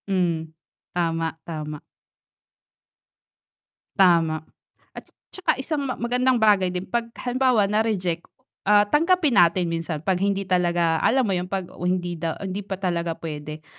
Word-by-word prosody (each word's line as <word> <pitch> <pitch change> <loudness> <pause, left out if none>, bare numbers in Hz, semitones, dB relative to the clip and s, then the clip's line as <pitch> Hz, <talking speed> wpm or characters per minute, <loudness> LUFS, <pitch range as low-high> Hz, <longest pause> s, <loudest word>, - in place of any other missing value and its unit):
Mm, 170 -4 -1 0.4
tama, 165 -2 -1
tama. 150 -2 -6 2.2
Tama. 170 -4 +4 0.5
At - - -9 0.3
'tsaka 380 - 0
isang 285 +3 -2
ma 255 - -3
magandang 250 +2 +1
bagay 205 -4 +4
din 180 +1 -4
'pag 230 +4 -2
halimbawa 250 -3 +2
na-reject, 195 -5 0 0.4
ah, 205 0 +6
tanggapin 325 - +3
natin 175 +1 +4
minsan 165 -1 -3
'pag 190 -1 +1
hindi 200 0 0
talaga 175 -3 +1
alam 260 +1 +3
mo 200 - 0
'yun, 180 0 -2
'pag 190 -1 -2 0.2
hindi 180 -1 -1
daw 165 0 -3
hindi 190 +2 -3
pa 195 -1 -5
talaga 170 -3 -2
puwede, 155 -1 -7
185 Hz, 135 wpm, -24 LUFS, 165-215 Hz, 2.2 s, ah